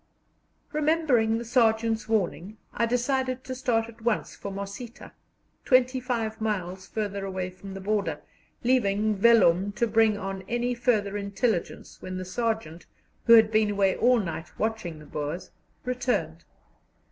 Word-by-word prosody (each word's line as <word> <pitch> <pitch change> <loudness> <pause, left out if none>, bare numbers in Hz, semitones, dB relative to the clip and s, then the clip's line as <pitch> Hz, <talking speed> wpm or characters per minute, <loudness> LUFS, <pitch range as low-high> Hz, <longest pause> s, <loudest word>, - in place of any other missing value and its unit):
Remembering 295 -8 +2
the 235 - -5
sergeant's 225 -2 +2
warning, 210 -1 -1 0.2
I 235 - +1
decided 255 +1 0
to 260 - -5
start 240 -3 0
at 230 0 -14
once 225 -1 -1
for 200 - -7
Mosita, 200 +5 -7 0.5
twenty 255 0 +3
five 230 -3 -3
miles 190 -3 -3
farther 200 -2 -3
away 185 -1 -3
from 195 +1 -10
the 195 - -6
border, 205 +1 -1 0.4
leaving 215 -4 +2
Vellum 200 -3 +4
to 235 - +1
bring 220 -1 +3
on 195 -1 -5
any 240 +1 0
further 220 -5 0
intelligence 200 -1 -2
when 185 0 -5
the 185 - -5
sergeant, 220 -5 -3 0.4
who 235 - +7
had 220 -1 +7
been 215 -1 +3
away 200 -2 +2
all 245 0 +4
night 165 -5 -5
watching 220 -7 -2
the 150 - -13
Boers, 150 +5 -5 0.3
returned. 245 -11 -2
220 Hz, 145 wpm, -27 LUFS, 195-240 Hz, 0.5 s, who